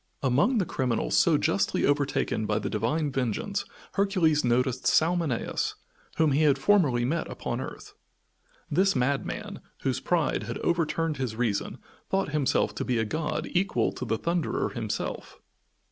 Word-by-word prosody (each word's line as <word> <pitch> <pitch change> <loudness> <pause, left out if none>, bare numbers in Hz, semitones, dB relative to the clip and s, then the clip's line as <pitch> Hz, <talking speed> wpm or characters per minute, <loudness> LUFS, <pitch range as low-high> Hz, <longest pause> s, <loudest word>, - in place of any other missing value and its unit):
Among 140 - +3
the 195 - +2
criminals 125 -6 -1
so - - +5
justly - - +1
overtaken 140 -6 0
by 105 - +1
the 105 - -3
divine 135 +8 0
vengeance 135 - -2 0.3
Hercules 185 -7 +2
noticed 125 +1 +1
Salmoneus, 165 -6 +1 0.4
whom 160 -2 +3
he 140 +3 +2
had 145 -3 +4
formerly 135 -7 +3
met 160 +6 -1
upon - - -4
earth. - - -8 0.7
This 190 +5 +2
madman, 135 +2 -1 0.2
whose 130 -1 0
pride 170 0 0
had 115 +2 -5
overturned 165 -2 0
his 125 -4 -3
reason, 110 -4 -1 0.3
thought 195 -3 0
himself 145 -3 +1
to - - -1
be 125 - 0
a 110 - +1
god 155 +7 -2
equal 190 +2 +1
to - - -7
the 115 -2 -1
Thunderer 170 +2 -1
himself. - - -4
145 Hz, 145 wpm, -27 LUFS, 125-165 Hz, 0.7 s, so